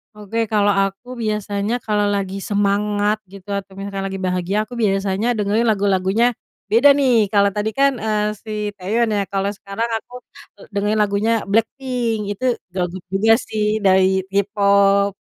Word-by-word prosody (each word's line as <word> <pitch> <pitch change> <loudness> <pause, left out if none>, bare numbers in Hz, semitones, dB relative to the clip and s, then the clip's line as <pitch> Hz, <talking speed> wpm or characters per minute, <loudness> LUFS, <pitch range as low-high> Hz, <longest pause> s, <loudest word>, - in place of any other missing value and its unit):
Oke, 210 +2 -7
kalau 205 -1 +2
aku 195 +5 -3 0.2
biasanya 210 0 -2
kalau 210 -1 +1
lagi 195 0 -3
semangat 205 +1 +1 0.2
gitu, 195 0 -13
atau 195 -1 -8
misalkan 195 0 -4
lagi 195 0 -4
bahagia, 185 +1 -1
aku 215 +3 -8
biasanya 195 +1 0
dengerin 210 +3 +1
lagu-lagunya 200 0 +2 0.5
beda 240 +6 +6
nih. 265 -3 +3 0.2
Kalau 200 -1 +4
tadi 210 +1 0
kan, 275 0 +5
eee, 210 -1 0
si 220 - -8 0.3
Taeyeon 220 +5 0
ya, - - +1
kalau 195 0 0
sekarang 200 +4 -4
aku, 245 - -14 0.5
eee, - - -13
dengerin 205 +2 0
lagunya 205 +2 +1 0.2
BLACKPINK. 230 +1 0
Itu 205 +5 -4 0.2
girl 180 0 -2
group 185 -1 -9
juga 220 +3 +4
sih 215 -1 -1 0.2
dari 190 0 +4
K-Pop. 200 0 +2
205 Hz, 155 wpm, -20 LUFS, 195-220 Hz, 0.5 s, beda